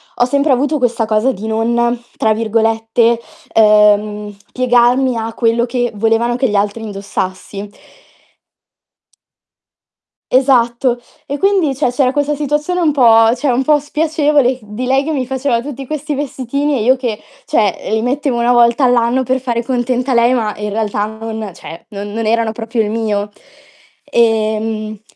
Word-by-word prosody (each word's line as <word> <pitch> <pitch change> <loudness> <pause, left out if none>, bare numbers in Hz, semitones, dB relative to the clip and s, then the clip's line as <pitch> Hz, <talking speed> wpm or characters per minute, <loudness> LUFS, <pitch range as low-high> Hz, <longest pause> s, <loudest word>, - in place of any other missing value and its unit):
ho 245 - +2
sempre 280 +2 +2
avuto 290 +4 +1
questa 240 -3 0
cosa 220 +4 +1
di 215 +2 -8
non 235 +2 0 0.2
tra 220 -1 +1
virgolette, 225 +1 +1 0.3
ehm, 210 -1 +3 0.2
"piegarmi" 250 0 +2
a 225 0 -4
quello 235 0 +1
che 245 -1 -2
volevano 225 +3 +1
che 260 - +1
gli 210 - -2
altri 205 +2 -1
indossassi. 200 0 -5 2.6
Esatto. 250 -2 +2 0.3
E 285 - -4
quindi 385 -7 +1
cioè, 255 -2 0
c'era 255 0 +1
questa 290 0 0
situazione 300 +5 -1
un 310 -4 +2
po' 225 -3 +5
cioè, 265 +1 0
un 255 +2 +1
po' 300 -1 +4
spiacevole 295 -3 +1
di 210 +4 -6
lei 270 +2 +2
che 315 - -3
mi 270 -4 -1
faceva 265 -2 0
tutti 270 0 -7
questi 300 +1 -4
vestitini 280 +1 -2
e 215 - -1
io 260 +3 +4
che 240 -5 -4 0.2
cioè, 210 -4 0
li 220 0 0
mettevo 260 0 -1
1 240 +1 +3
volta 240 +2 +4
all'anno 245 +1 +2
per 260 +1 -1
fare 240 -2 -1
contenta 250 +1 -1
lei, 235 +1 +4
ma 220 -4 -1
in 210 0 -4
realtà 210 -1 -1
non 220 -1 -6
cioè, 165 0 -11
non 205 0 -7
non 225 0 -3
erano 225 0 +1
proprio 225 +1 -2
il 210 - -1
mio. 210 -2 -2 0.8
Ehm 220 -1 0
235 Hz, 155 wpm, -15 LUFS, 220-265 Hz, 2.6 s, po